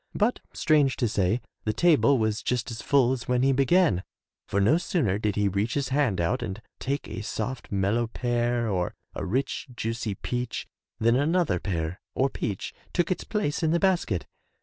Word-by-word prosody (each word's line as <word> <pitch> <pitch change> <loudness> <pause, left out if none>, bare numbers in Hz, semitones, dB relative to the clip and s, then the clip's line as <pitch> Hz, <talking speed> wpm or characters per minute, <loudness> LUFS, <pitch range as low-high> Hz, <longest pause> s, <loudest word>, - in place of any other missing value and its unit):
But 220 +4 +2
strange 145 -4 +3
to 120 - +1
say, 105 +2 +1 0.2
the 110 - 0
table 145 0 +4
was 110 -1 0
just 125 0 -1
as 115 -2 -6
full 130 -1 +3
as 130 -2 -3
when 125 0 +2
he 135 - +4
began, 135 - +3 0.5
for 100 - 0
no 115 - +4
sooner 120 - 0
did 105 -2 0
he 105 -1 +2
reach 100 +4 0
his 140 -3 0
hand 130 -9 +1
out 115 +10 +1
and 100 -3 -4 0.2
take 140 +1 -2
a - - -5
soft 110 +4 -4
mellow 100 +4 +1
pear 120 0 0
or 90 -4 -1 0.2
a - - -4
rich 135 +7 -1
juicy 115 -2 -2
peach 125 +4 -3 0.3
than 115 +2 +3
another 145 - +2
pear 85 -2 -3
or 135 +1 +2
peach 100 -4 -4 0.2
took 175 0 +1
its 185 - -1
place 205 -9 -1
in 160 - +2
the 170 +2 +2
basket. 170 - +1
120 Hz, 185 wpm, -27 LUFS, 105-140 Hz, 0.5 s, table